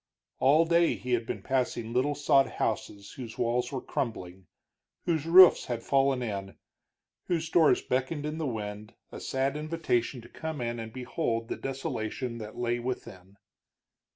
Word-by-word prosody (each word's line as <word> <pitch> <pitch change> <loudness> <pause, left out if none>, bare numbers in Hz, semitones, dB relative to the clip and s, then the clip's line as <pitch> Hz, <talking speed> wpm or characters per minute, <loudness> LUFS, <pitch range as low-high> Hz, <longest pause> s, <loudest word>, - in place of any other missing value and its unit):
All 150 +5 +5
day 170 0 +3
he 125 0 -4
had 115 -1 0
been - - -4
passing 120 -3 -1
little 140 +4 +1
sod 140 -1 +4
houses 100 -1 -3
whose 120 -4 -8
walls 120 +1 0
were 130 -2 -4
crumbling, 95 - -4 0.6
whose 160 -3 0
roofs 180 +2 +8
had 120 -2 -4
fallen 135 -2 +2
in, 100 -4 -5 0.7
whose 165 -2 -1
doors 165 -3 +4
beckoned 135 +4 -1
in 155 +1 -3
the 155 - -1
wind 105 -3 -5 0.2
a - - -7
sad 135 +1 -1
invitation 150 -6 -1
to 115 - -13
come 160 +3 -6
in 120 -1 -3
and 110 -1 -6
behold 115 -2 -2
the - - -2
desolation 125 -2 -4
that 110 -1 -8
lay 120 0 0
within. 100 -6 -6
125 Hz, 155 wpm, -29 LUFS, 115-145 Hz, 0.7 s, roofs